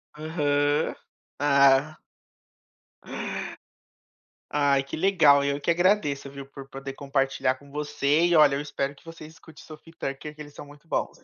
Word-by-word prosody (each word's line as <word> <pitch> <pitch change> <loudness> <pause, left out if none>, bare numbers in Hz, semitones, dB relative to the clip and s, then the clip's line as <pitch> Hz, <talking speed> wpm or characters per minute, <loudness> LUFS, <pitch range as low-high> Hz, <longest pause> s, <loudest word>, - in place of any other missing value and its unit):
Aham. 150 -1 0 0.5
Ah. 140 +1 +4 2.5
Ai, 140 -2 +2
que 140 - -7
legal, 160 -6 +4
eu 140 0 -1
que 170 - +1
agradeço, 170 -6 +1
viu, 140 0 -9
por 135 0 -12
poder 135 0 -8
compartilhar 135 -2 -1
com 140 +1 -18
você 150 +2 +1
e 175 -1 +2
olha, 145 -3 +6
eu 140 - -2
espero 145 -1 -3
que - - -22
você 165 -1 -10
escute 160 -1 -15
Sophie 155 +1 -13
e - - -25
Tucker 150 +1 -6
que 155 - -11
eles 145 -1 -11
são - - -10
muito 145 +3 -17
bons. - - -2
145 Hz, 155 wpm, -26 LUFS, 140-155 Hz, 2.5 s, olha